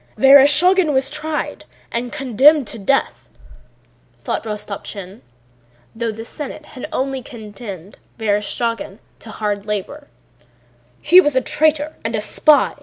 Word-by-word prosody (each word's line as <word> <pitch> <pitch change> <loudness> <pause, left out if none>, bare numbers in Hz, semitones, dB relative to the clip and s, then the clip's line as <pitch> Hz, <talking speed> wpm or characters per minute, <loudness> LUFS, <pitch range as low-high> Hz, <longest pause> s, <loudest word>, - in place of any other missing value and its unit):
"Vereshchágin 295 +6 +6
was 265 0 +1
tried 310 -1 -4 0.3
and 240 +1 -3
condemned 275 +1 +3
to 230 - -7
death," 270 +8 -1 0.9
thought - - -4
Rostopchín 205 -1 -7 0.7
(though 230 0 -3
the 225 +1 -9
Senate 300 +3 -7
had 255 - -9
only 265 0 -2
condemned 210 - -10 0.2
Vereshchágin 220 0 -2 0.2
to 230 - -13
hard 210 -1 -4
labor), 210 +9 -5 1.0
"he 365 +1 +7
was 295 -6 -1
a - - +5
traitor 305 +2 0
and 225 0 -2
a 215 - -1
spy. 290 +6 +3
245 Hz, 120 wpm, -19 LUFS, 210-290 Hz, 1.0 s, he